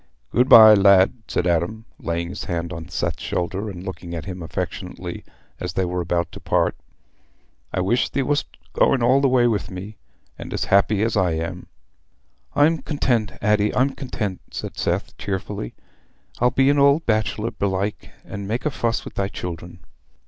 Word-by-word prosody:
"Good 125 +2 +2
bye, 110 -1 +10
lad," 100 -2 +6
said - - -1
Adam, 90 +6 0
laying 85 0 -2
his 100 - -6
hand 85 -1 -3
on 85 0 -7
Seth's - - -2
shoulder 95 +4 -2
and 90 -2 -8
looking 90 -3 -6
at 80 - -5
him 90 -2 -6
affectionately 80 - -5 0.4
as - - -4
they 95 0 0
were 90 0 -2
about 85 0 -1
to - - -9
part. - - +1 1.0
"I 95 - -1
wish 100 +7 +1
thee 140 - -1
wast 145 +2 0 0.3
going 130 -3 +3
all 130 +3 +4
the 140 - +3
way 125 -1 +4
wi' 115 -4 +2
me, 100 +3 -8 0.4
and - - -6
as - - -1
happy 100 +1 +4
as 115 0 0
I 90 -4 +2
am." 85 +3 -4 0.9
"I'm 155 +3 +4
content, 120 -7 0
Addy, 105 0 +2
I'm 130 +2 +3
content," 110 -9 -4
said - - -6
Seth - - -2
cheerfully. 95 -10 -4 0.6
"I'll 125 - +4
be 135 +3 +3
an 145 - +2
old 140 +3 +4
bachelor, 110 0 0
belike, 100 -1 -2 0.2
and 100 0 -6
make 115 +7 -2
a 150 - +1
fuss 115 -3 -1
wi' - - -7
thy 100 - -1
children." 85 -1 -7
100 Hz, 175 wpm, -22 LUFS, 90-120 Hz, 1.0 s, bye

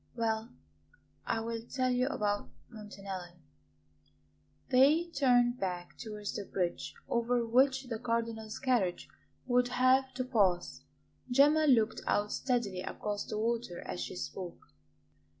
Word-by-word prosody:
Well, 225 -1 -1 0.8
I 225 - 0
will 230 0 -3
tell 255 +2 -1
you 250 +1 +2
about 205 -7 -1 0.2
Montanelli." 195 -5 -8 1.4
They 300 +7 +5
turned 250 -4 +3
back 180 -2 -4
towards 210 -3 -6
the 205 - -4
bridge 170 -8 -3
over 235 0 +1
which 265 +3 +3
the 235 -4 -5
Cardinal's 230 -2 -2
carriage 235 -9 0 0.4
would 250 0 +3
have 255 +1 +3
to 255 - -1
pass. 200 -8 +1 0.5
Gemma 295 +5 +5
looked 225 -5 +3
out 205 0 +1
steadily 235 -8 -1
across 205 +2 -4
the - - -3
water 225 -5 -2
as - - -5
she - - -5
spoke. 180 - -7
230 Hz, 125 wpm, -32 LUFS, 205-255 Hz, 1.4 s, They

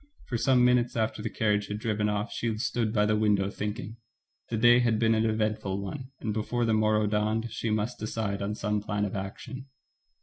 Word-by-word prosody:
For 120 - -4
some 125 +1 +4
minutes 125 -1 +3
after 110 -1 -1
the 110 - -2
carriage 105 -2 0
had 105 - -3
driven 105 -1 0
off 105 +2 -2
she 115 -2 -2
stood 115 -1 -1
by 105 -2 +2
the 105 0 +2
window, 105 -2 +2
thinking. 110 +3 -5 0.5
The 115 - -1
day 120 +2 +6
had 120 -3 +2
been 115 0 +3
an 110 0 +2
eventful 105 -3 -1
one, 125 +7 -6
and 110 - -2
before 115 +3 -1
the 115 - +2
morrow 110 0 +3
dawned 110 +2 0
she 115 +1 -3
must 110 +3 -1
decide 105 -2 -2
on 100 +1 -2
some 105 -1 -1
plan 105 0 -1
of 100 - -4
action. 100 +7 -6
110 Hz, 205 wpm, -28 LUFS, 105-115 Hz, 0.5 s, day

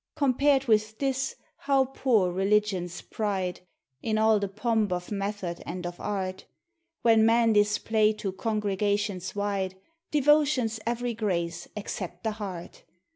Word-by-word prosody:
Compared 275 0 +3
with 215 -2 +2
this, 270 -1 -1 0.2
how 275 -1 +2
poor 240 -8 +1
Religion's 195 -2 0
pride, 195 -5 -2 0.4
In 220 -1 0
all 220 -1 +4
the 200 - -1
pomp 215 0 0
of 180 +1 -3
method 195 -3 -3
and 180 +1 -6
of 175 0 -6
art, 190 -2 -3 0.6
When 225 -2 +5
men 230 0 +4
display 210 +1 +3
to 205 -2 -4
congregations 205 -2 -1
wide. 200 -2 -1 0.3
Devotion's 290 -6 +3
every 240 0 -1
grace, 175 -6 -2
except 185 -3 -5
the 220 - 0
heart 195 -5 -7
210 Hz, 130 wpm, -27 LUFS, 190-230 Hz, 0.6 s, When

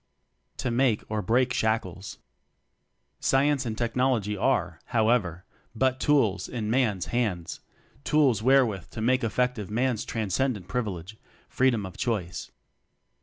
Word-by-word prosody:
To 125 - -2
Make 120 -3 +2
or 110 -1 0
Break 125 +4 +2
Shackles. 105 -5 -2 1.0
Science 135 -1 +2
and 110 -1 -4
Technology 120 -3 0
are, 95 -7 0
how 110 -2 +1
ever, 90 -7 0 0.3
but 130 +2 +1
tools 125 -11 +2
in 110 -3 -3
Man's 110 -8 +1
hands; 105 -9 -1 0.4
tools 140 -8 +3
wherewith 120 -7 +2
to - - -8
make 130 +3 +2
effective 115 -2 -1
Man's 120 +1 0
transcendent 110 -1 -2
privilege: 105 -5 -4 0.3
Freedom 125 -6 +1
of 95 - -9
Choice. 105 -8 -3
115 Hz, 120 wpm, -27 LUFS, 105-130 Hz, 1.0 s, tools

